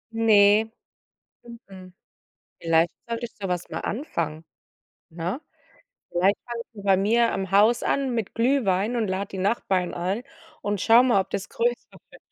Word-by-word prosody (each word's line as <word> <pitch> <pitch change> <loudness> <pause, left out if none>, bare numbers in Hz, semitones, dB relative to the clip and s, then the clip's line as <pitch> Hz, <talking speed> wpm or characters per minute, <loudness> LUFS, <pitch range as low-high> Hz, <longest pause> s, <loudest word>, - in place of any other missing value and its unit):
Ne, 220 0 +4 0.7
mhm, 195 -6 -13 0.7
vielleicht 165 0 +2 0.2
sollte 230 +1 -3
ich - - -19
so 195 -2 -6
was 180 -1 -3
mal - - -5
anfangen, 165 - -4 0.7
ne? 170 - -4 0.7
Vielleicht 185 +4 +2
fange 235 -1 -5
ich 205 -3 -11
bei 195 -1 +4
mir 230 +4 +2
am 190 -1 -3
Haus 210 +4 +4
an 270 -3 0
mit 225 -4 -3
Glühwein 230 -4 +1
und 225 -4 -1
lade 190 +1 -3
die 190 - -7
Nachbarn 190 -2 0
ein 185 +6 -2 0.4
und 205 -1 -2
schaue 230 +4 +6
mal, 240 -6 +3
ob - - -5
das 195 - -4
größer 240 +1 +1
wird 240 - -18
205 Hz, 155 wpm, -24 LUFS, 185-235 Hz, 0.7 s, schaue